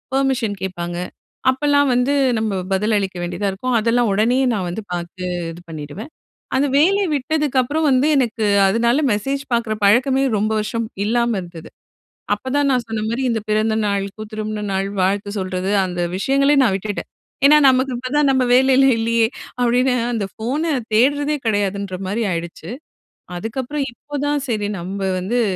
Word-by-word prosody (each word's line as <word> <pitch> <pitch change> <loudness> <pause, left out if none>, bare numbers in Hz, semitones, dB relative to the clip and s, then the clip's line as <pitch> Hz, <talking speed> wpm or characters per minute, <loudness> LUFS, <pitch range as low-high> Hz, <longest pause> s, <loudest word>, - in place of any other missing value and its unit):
Permission 265 -6 0
கேட்பாங்க, 175 -2 -4 0.5
அப்பல்லாம் 285 +1 +2
வந்து 250 +3 +2 0.2
நம்ப 220 -2 -1 0.2
பதில் 210 +3 +1
அளிக்க 195 -2 -2
வேண்டியதா 200 +4 -2
இருக்கும். 245 +6 -2
அதெல்லாம் 230 +1 +2
ஒடனே 225 +5 +2 0.2
நான் 190 -4 -2
வந்து 185 +6 -4
பாத்து 175 +1 -5 0.3
இது 170 +1 -11
பண்ணிடுவேன். 160 - -8 0.4
அந்த 275 +2 +2
வேலை 390 +7 +4
விட்டதுக்கப்புறம் 290 +1 0
வந்து, 260 +3 +3
எனக்கு 230 -4 0 0.2
அதுனால 235 +8 +2
மெசேஜ் 270 +7 -2
பாக்குற 235 -2 0
பழக்கமே 260 +6 +3
ரொம்ப 215 +2 0
வருஷம் 230 +2 -2 0.2
இல்லாம 235 +2 +1
இருந்தது. 170 -2 -10 0.6
அப்பதான் 265 +6 0
நான் 250 -2 +1
சொன்ன 225 -1 -3
மாரி 235 +3 -2
இந்த 230 -1 0
பிறந்தநாளுக்கோ, 215 -1 0
திருமண 215 0 -4
நாள் 195 0 -1
வாழ்த்து 200 +2 0
சொல்றது, 185 0 -2
அந்த 180 -1 -3 0.2
விஷயங்களையே 275 +6 +3
நான் 220 -6 +2
விட்டுட்டேன். 205 +1 -4 0.4
"ஏன்னா 300 +2 +8
நமக்கு 260 0 +1
இப்ப 255 +4 0
நம்ப 260 -1 +2
வேலையில 265 +1 +5
இல்லையே," 230 0 +2 0.3
அப்டின்னு 250 +1 +2 0.2
அந்த 220 -4 -1 0.2
போன 260 +7 -1 0.3
தேடுறதே 285 +6 +2
கிடையாதுன்ற 200 -2 -1
மாரி 215 +5 -1
ஆயிடுச்சு. 170 +1 -5 0.7
அதுக்கப்புறம் 260 +8 -3
இப்போதான் 290 +3 -3
சரி 210 -3 -1
நம்ப 190 +3 -5 0.2
வந்து, 230 +7 0
230 Hz, 145 wpm, -20 LUFS, 200-265 Hz, 0.7 s, ஏன்னா